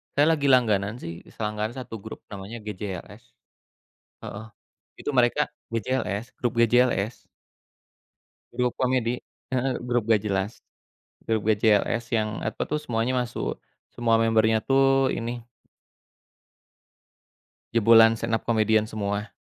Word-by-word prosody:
saya 145 - +5
lagi 140 -2 -1
langganan 110 -4 +3
sih, 85 0 -7
selangganan 105 +1 -3
satu 115 -3 -7
grup 110 - -8
namanya 100 +4 -7
GJLS. 100 -3 -7 1.0
Heeh, 110 +2 -7 0.5
itu - - -4
mereka 120 -1 +3 0.3
GJLS, 115 -2 -1
grup 120 -1 0
GJLS. 120 -2 +3 1.4
Grup 125 0 0
komedi, 125 -1 0 0.3
heeh, 130 +1 0
grup 120 -1 0
nggak 105 -3 +4
jelas. 100 +1 -1 0.7
Grup 110 -2 +1
GJLS 110 +2 +3
yang 110 0 -1
apa - - -2
tuh 150 - -2
semuanya 120 -3 -1
masuk, 120 0 -4 0.3
semua 115 -1 +2
membernya 110 -1 +3
tuh 135 0 +3
ini 120 0 -4 2.3
jebolan 115 0 +6
stand-up 115 0 -1
comedian 110 -1 +2
semua. 100 0 -3
115 Hz, 110 wpm, -25 LUFS, 105-125 Hz, 2.3 s, jebolan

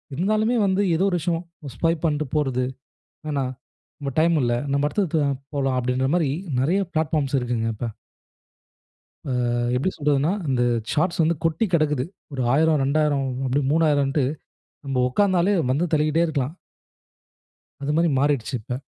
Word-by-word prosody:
இருந்தாலுமே 215 - +1
வந்து 195 +1 +2
ஏதோ 185 - +2
ஒரு 180 - 0
விஷயம் 170 +1 -1 0.3
ஸ்வைப் 165 +1 0
பண்ட்டு 155 -1 0
போறது 130 -4 +1 0.7
என்ன, 145 -2 0 0.8
"டைம் 165 +1 +3
இல்ல. 120 -1 +1 0.2
நம்ம 140 +1 +2
அடுத்தடுத்து 180 -4 0
போவோம், 140 -1 0 0.2
போலாம்" 135 -2 0
அப்டிங்கற 125 +2 0
மாரி 160 -6 +1 0.3
நிறைய 175 +9 +2
பிளாட்பார்ம்ஸ் 155 -3 0
இருக்குங்க 120 -2 -1
இப்ப. 120 - -4 1.4
அ. - - 0 0.4
எப்படி 140 +9 0
சொல்றதுனா. 145 +2 +1 0.2
அந்த 130 -2 +1 0.3
ஷார்ட்ஸ் 170 +2 +1
வந்து 165 +1 +2
கொட்டி 165 +7 +1
கடக்குது. 150 -5 +2 0.3
ஒரு 130 -2 -2
1000, 155 +1 +3
2000, 140 0 +1 0.2
இப்டி 135 +3 +1
3000ன்ட்டு 145 -3 +2 0.6
நம்ம 135 -2 0
உட்காந்தாலே 185 +5 +2 0.2
வந்து 165 +6 +1
தள்ளிகிட்டே 155 +1 +2
இருக்கலாம். 145 -2 -2 1.3
அது 145 +1 -1
மாரி 170 0 +3
மாறிடுச்சு 140 -2 0
இப்ப. 125 +4 -5
150 Hz, 135 wpm, -23 LUFS, 135-165 Hz, 1.4 s, டைம்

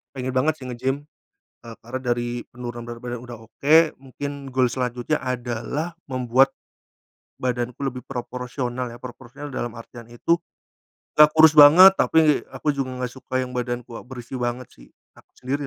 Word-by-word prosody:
Pengen 130 0 -3
banget 140 +5 +1
sih - - -8
ngegym, 130 +4 -2 0.6
eee, 115 -1 -10
karena 125 +3 -6
dari 120 -1 -2
penurunan 120 -1 -7
berat 120 0 -8
badan 120 -1 -5
udah 120 -2 -9
oke. 115 +7 +1 0.3
Mungkin 140 +1 -7
goal 130 0 +2
selanjutnya 125 +3 -2
adalah 125 +6 -3 0.2
membuat 130 +1 +3 0.9
badanku 125 -1 -2
lebih 125 -1 -4
proporsional 125 0 -5
ya. 120 - -11
Proporsional 125 +3 -10
dalam 120 -2 -4
artian 115 0 -12
itu 170 +8 0 0.8
gak 150 0 +7
kurus 155 -1 +6
banget, 165 +7 +10
tapi 155 -2 +3
aku 150 - -1
juga 130 -3 -3
gak 125 - -2
suka 130 0 -2
yang 125 - -5
badanku, 120 -1 -4
berisi 125 0 -8
banget 120 0 -3
sih - - -18 0.3
aku - - -21
sendiri 140 +3 -3
125 Hz, 155 wpm, -23 LUFS, 120-135 Hz, 0.9 s, banget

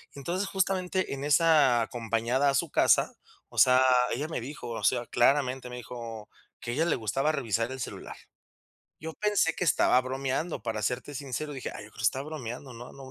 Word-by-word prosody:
Entonces, 175 +8 -3
justamente, 185 -2 0
en 140 0 -5
esa 145 -5 +4
acompañada 120 +4 0
a 140 - +1
su - - 0
casa, - - +3 0.3
o - - -15
sea, 130 0 +6 0.3
ella 150 - -2
me 160 - -3
dijo, 135 +1 -7
o 115 - -5
sea, 120 - +2
claramente 130 0 +2
me 125 - -7
dijo 115 -2 -8 0.3
que 120 - -4
a - - -3
ella 160 +4 +2
le 170 - +2
gustaba 135 +7 0
revisar 115 -3 -1
el 130 - -7
celular. - - -7 0.9
Yo 160 +1 -6
pensé 205 -6 +1
que 180 - -1
estaba 130 -4 +4
bromeando, 135 +5 -3
para 110 -1 -3
serte 125 +7 -2
sincero, 140 +2 -4
dije: 130 - -5
"Ay, - - -8
yo - - -15
creo - - -21
que - - -5
estaba 130 +5 +1
bromeando, 130 -3 -6
¿no?, 120 +2 -10
no 135 -1 -11
130 Hz, 195 wpm, -28 LUFS, 120-155 Hz, 0.9 s, sea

